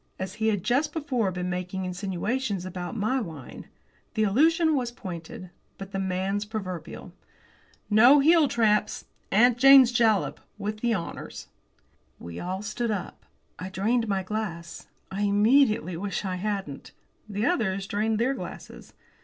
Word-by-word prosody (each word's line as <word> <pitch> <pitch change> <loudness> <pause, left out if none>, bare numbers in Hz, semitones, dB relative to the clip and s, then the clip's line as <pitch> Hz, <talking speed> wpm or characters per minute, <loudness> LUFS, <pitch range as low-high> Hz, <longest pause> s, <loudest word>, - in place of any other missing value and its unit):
As 185 0 -5
he 220 - +2
had 205 -5 0
just 275 +7 +1
before 255 - -1
been 180 0 -4
making 180 +1 -3
insinuations 195 +3 -3
about 180 +3 -6
my 255 +5 0
wine, 160 - -9 0.5
the 220 - +2
allusion 315 - +3
was 250 -3 -1
pointed. 180 -5 -8 0.3
But 195 0 -9
the 195 - -3
man's 190 +2 -1
proverbial. 185 -6 -7 0.7
"No 240 +7 +7
heeltraps 240 -9 +3 0.3
'Aunt 240 +3 +4
Jane's 270 -2 +8
Jalap' 225 -5 +2 0.2
with 215 +1 -4
the 235 0 +1
honours!" 170 -4 -7 0.7
We 85 0 -8
all 185 +3 -4
stood 230 +3 -3
up. 205 -4 -5 0.3
I 185 +2 -5
drained 225 +5 0
my 195 -2 -1
glass. 185 -5 -5 0.2
I 195 +1 -3
immediately 215 -1 +3
wished 195 +2 -4
I 185 -1 -2
hadn't. 195 -7 -4 0.4
The 205 +2 -2
others 200 - 0
drained 215 +2 -1
their 245 +5 +1
glasses. - - -9
205 Hz, 140 wpm, -26 LUFS, 185-235 Hz, 0.7 s, Jane's